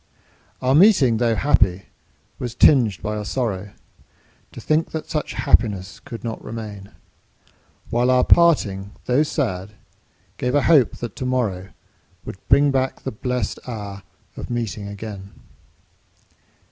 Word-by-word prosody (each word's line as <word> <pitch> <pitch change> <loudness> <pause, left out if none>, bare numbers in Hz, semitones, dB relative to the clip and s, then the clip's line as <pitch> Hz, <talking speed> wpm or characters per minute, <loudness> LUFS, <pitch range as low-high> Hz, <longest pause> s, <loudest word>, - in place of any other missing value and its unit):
Our 130 +1 +3
meeting, 150 - +5
tho' 115 -1 +1
happy, 100 -9 +2 0.6
was 120 -1 -5
tinged 120 - +4
by 105 0 -2
a 105 - -4
sorrow 105 -4 -3 0.8
To - - -10
think 155 +1 0
that 160 -1 -6
such 150 - -2
happiness 95 -5 +1
could 120 -5 -9
not 115 -2 -5
remain; 105 -3 -8 1.0
While 120 +2 +2
our 125 0 +4
parting, 105 - +3
tho' 125 +4 +2
sad, 105 - -2 0.6
gave 125 +2 -1
a 145 - +3
hope 150 -7 +4
that 120 -4 -6
to 130 - -4
morrow 105 -8 -1 0.6
Would - - -7
bring 140 +1 +5
back 130 -1 -1
the 130 - -3
blest 125 +2 -3
hour 100 -4 -6 0.3
of - - -8
meeting 115 -4 -3
again. 100 -1 -8
115 Hz, 135 wpm, -21 LUFS, 100-130 Hz, 1.0 s, meeting